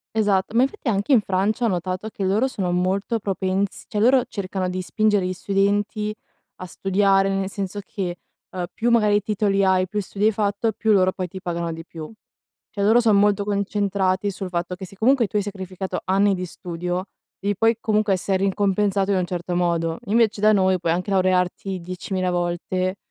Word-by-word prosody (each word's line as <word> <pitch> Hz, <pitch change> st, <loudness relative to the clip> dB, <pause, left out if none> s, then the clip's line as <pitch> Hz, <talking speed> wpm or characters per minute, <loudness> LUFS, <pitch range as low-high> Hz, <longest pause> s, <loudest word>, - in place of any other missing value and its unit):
Esatto, 205 Hz, -1 st, +1 dB
ma 235 Hz, -, +4 dB
infatti 270 Hz, -, -1 dB
anche 205 Hz, +5 st, +1 dB
in 235 Hz, -5 st, +6 dB
Francia 200 Hz, +5 st, 0 dB
ho 230 Hz, -, +3 dB
notato, 185 Hz, +3 st, -3 dB
che 200 Hz, -, -7 dB
loro 205 Hz, +7 st, +2 dB
sono 195 Hz, -9 st, -2 dB
molto 190 Hz, +6 st, 0 dB
propens 195 Hz, 0 st, -2 dB
cioè 210 Hz, -, -3 dB
loro 255 Hz, +1 st, +5 dB
cercano 190 Hz, -3 st, -3 dB
di 185 Hz, 0 st, -3 dB
spingere 210 Hz, 0 st, +1 dB
gli 185 Hz, -, -1 dB
studenti 205 Hz, +3 st, 0 dB, 0.4 s
a 185 Hz, -, -8 dB
studiare, 195 Hz, +1 st, +2 dB
nel 195 Hz, 0 st, -1 dB
senso 200 Hz, 0 st, -4 dB
che, 190 Hz, -4 st, -4 dB, 0.3 s
ehm, 180 Hz, -1 st, -4 dB
più 235 Hz, +1 st, 0 dB
magari 210 Hz, -3 st, +3 dB
titoli 200 Hz, -1 st, +1 dB
hai, 185 Hz, -1 st, +2 dB
più 210 Hz, +3 st, -2 dB
studi 200 Hz, +3 st, -1 dB
hai 220 Hz, -, +4 dB
fatto, 205 Hz, +2 st, 0 dB
più 220 Hz, 0 st, +1 dB
loro 185 Hz, -2 st, +4 dB
poi 185 Hz, -1 st, -4 dB
ti 190 Hz, +2 st, -8 dB
pagano 170 Hz, -2 st, -3 dB
di 165 Hz, 0 st, -7 dB
più. 160 Hz, +3 st, -9 dB, 0.6 s
Cioè 200 Hz, -, -2 dB
loro 225 Hz, +4 st, +5 dB
son 220 Hz, -3 st, +4 dB
molto 205 Hz, 0 st, +3 dB
concentrati, 200 Hz, -1 st, 0 dB
sul 190 Hz, 0 st, -5 dB
fatto 175 Hz, +1 st, -2 dB
che, 190 Hz, -, -8 dB
se 195 Hz, -, -15 dB
comunque 240 Hz, +3 st, +3 dB
tu 210 Hz, -, -4 dB
hai 205 Hz, -, +2 dB
sacrificato 190 Hz, -2 st, -5 dB
anni 195 Hz, +1 st, +3 dB
di 185 Hz, -1 st, -3 dB
studio, 180 Hz, 0 st, -4 dB, 0.3 s
devi 205 Hz, 0 st, -1 dB
poi 225 Hz, +3 st, +3 dB
comunque 215 Hz, -2 st, +1 dB
essere 190 Hz, +1 st, 0 dB
ricompensato 195 Hz, 0 st, +1 dB
in -, -, +2 dB
un 180 Hz, -, 0 dB
certo 175 Hz, 0 st, -3 dB
modo. 170 Hz, -2 st, 0 dB
Invece 215 Hz, 0 st, +2 dB
da 215 Hz, 0 st, +6 dB
noi, 190 Hz, -2 st, +3 dB
puoi 165 Hz, -1 st, +1 dB
anche 180 Hz, +4 st, -2 dB
laurearti 185 Hz, 0 st, +1 dB
diecimila 185 Hz, +1 st, -3 dB
volte, 180 Hz, +2 st, -1 dB
195 Hz, 190 wpm, -23 LUFS, 185-210 Hz, 0.6 s, in